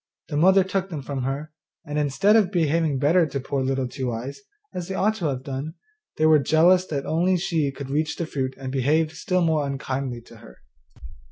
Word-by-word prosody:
The 150 - -4
mother 190 +4 +5
took 190 0 -2
them 155 -6 -5
from 135 -1 -4
her, 145 +3 -4 0.3
and, 150 -1 -2
instead 150 +9 +3
of 205 -4 +3
behaving 160 -4 +1
better 160 +5 +3
to 140 -1 -4
poor 135 +1 -2
Little 130 0 -1
Two 130 -1 -4
eyes, 125 +5 -6 0.3
as 175 -1 -5
they 190 - -4
ought 215 +3 +2
to 175 - -4
have 130 -3 -2
done, 140 +4 -5 0.4
they 155 - +2
were 155 -1 +6
jealous 170 +6 +4
that 140 -3 -3 0.4
she 170 -2 -1
only 140 -2 0
could 135 0 -8
reach 155 +2 0
the 170 - -3
fruit 130 -4 -3
and 135 -1 -6
behaved 150 +4 +1
still 180 +3 -1
more 155 -3 +1
unkindly 135 -2 -4
to 115 0 -16
her. 60 - -15
150 Hz, 205 wpm, -24 LUFS, 135-170 Hz, 0.4 s, were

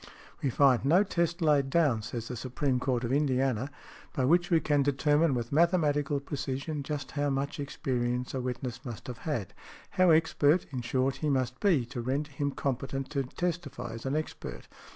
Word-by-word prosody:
|114| - - -15 0.3
"We 140 - +1
find 130 -1 +4
no 170 +8 +5
test 170 -2 -1
laid 145 -3 +3
down," 140 -8 +3
says 115 +1 -5
the 125 - -5
Supreme 130 +2 -1
Court 125 -1 0
of 120 +2 -1
Indiana, 135 -3 +1 0.4
"by 130 -4 +1
which 175 +5 +3
we 165 - +4
can 145 -2 +2
determine 145 +2 +2
with 120 -1 -3
mathematical 150 -3 +2
precision 140 +1 -4
just 145 -1 -4
how 145 0 0
much 140 +1 -2
experience 125 -3 -2
a 130 - -2
witness 125 0 -4
must 120 -6 -7
have 125 -3 -7
had, 115 - -2 0.4
how 185 -1 +4
expert, 160 0 +4
in 130 -3 -3
short, 130 +3 0
he 155 - -1
must 130 -2 0
be, 165 - +3
to 120 0 -5
render 140 +5 -2
him 140 +1 -1
competent 135 0 -3
to 140 -2 0
testify 155 -2 -4
as 115 +3 -6
an 135 - 0
expert." 155 0 -5
140 Hz, 185 wpm, -29 LUFS, 125-150 Hz, 0.4 s, no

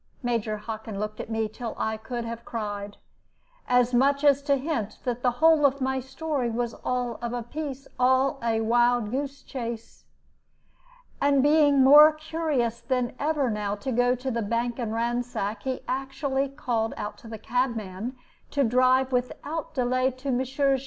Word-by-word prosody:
Major 230 -3 -1
Hockin 215 -1 -6
looked 215 0 -4
at - - -6
me 225 -1 0
till 225 +2 -6
I 220 0 -1
could 235 +2 -5
have 230 0 -6
cried, 205 -3 -5 0.7
as 250 0 +3
much 280 +3 +3
as 285 -1 +5
to 280 0 +2
hint 265 -6 -3
that 245 -1 -2
the 250 - +3
whole 320 -1 +5
of 280 0 +3
my 265 0 0
story 265 0 -2
was 235 0 -2
all 245 -2 -2
of 235 0 -3
a 240 -1 -3
piece, 275 +1 -6
all 260 +2 +3
a 225 -1 0
wild 240 -1 +2
goose 280 +2 -3
chase. 235 -3 -7 1.2
And 280 -1 +4
being 290 -2 +5
more 295 +3 +9
curious 305 -7 -1
than 250 -2 -1
ever 290 -4 +1
now 210 -1 -2
to 210 +6 -4
go 245 +1 +3
to 260 +1 -4
the 235 -1 -1
bank 235 +3 -1
and 230 -3 -2
ransack, 230 -2 -2
he 260 -1 -3
actually 270 +1 -1
called 240 -5 -2
out 210 0 -5
to - - -13
the 220 0 -7
cabman 230 -1 -2 0.3
to 280 - +1
drive 255 +2 +3
without 280 +6 -3
delay 255 0 +2
to 265 +1 -5
Messrs. 265 +2 +1
250 Hz, 165 wpm, -26 LUFS, 230-275 Hz, 1.2 s, more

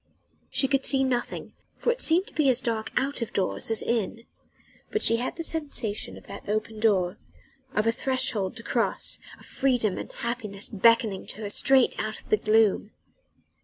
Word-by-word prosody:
She 270 - +2
could 275 0 +1
see 270 -1 +5
nothing, 250 -2 -3 0.2
for 480 - +1
it - - -2
seemed 345 +4 +4
to - - -13
be 295 -3 +2
as 250 -1 +3
dark 225 -4 -3
out 275 -1 +1
of 230 - -4
doors 190 +3 -1
as 225 - -1
in: 230 0 -2 0.7
but 430 - 0
she 230 - +8
had 245 - -3
the 330 - -5
sensation 285 -10 -1
of - - -15
that 200 0 -10
open 215 +1 -2
door, 200 -3 +1 0.6
of 215 - +1
a 230 - +3
threshold 230 -6 -1
to 230 - -8
cross, - - 0 0.2
of - - -16
freedom 245 -7 0
and - - -8
happiness 220 -4 -5
beckoning 225 -1 +2
to 215 - -6
her 205 -1 -5
straight 265 +2 +3
out 215 0 -4
of - - -20
the 215 - +4
gloom. 215 -1 +2
230 Hz, 185 wpm, -26 LUFS, 215-265 Hz, 0.7 s, she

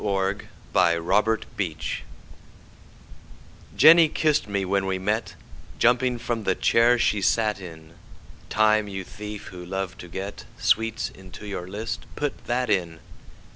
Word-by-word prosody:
Jenny 95 -4 0
kiss'd 105 +6 +1
Me 90 -6 -2 2.0
JENNY 165 0 +8
kiss'd 155 -5 +1
me 100 -2 -1
when 95 +1 0
we 95 0 0
met, 105 +4 -2 0.4
Jumping 125 +1 +3
from 115 -1 -3
the 95 -2 +1
chair 120 +1 +4
she 105 -3 +1
sat 105 0 +1
in; 80 -3 -11 0.6
Time, 110 -1 +3
you 95 -1 -5
thief, 105 +2 -8
who 90 -2 -9
love 95 +1 -4
to 90 - -9
get 95 +4 -6
Sweets 115 +1 +1
into 95 +2 -12
your 95 -3 -5
list, 105 +4 -5
put 145 -1 -3
that 125 +1 0
in! 85 -4 0
100 Hz, 135 wpm, -25 LUFS, 95-115 Hz, 2.0 s, JENNY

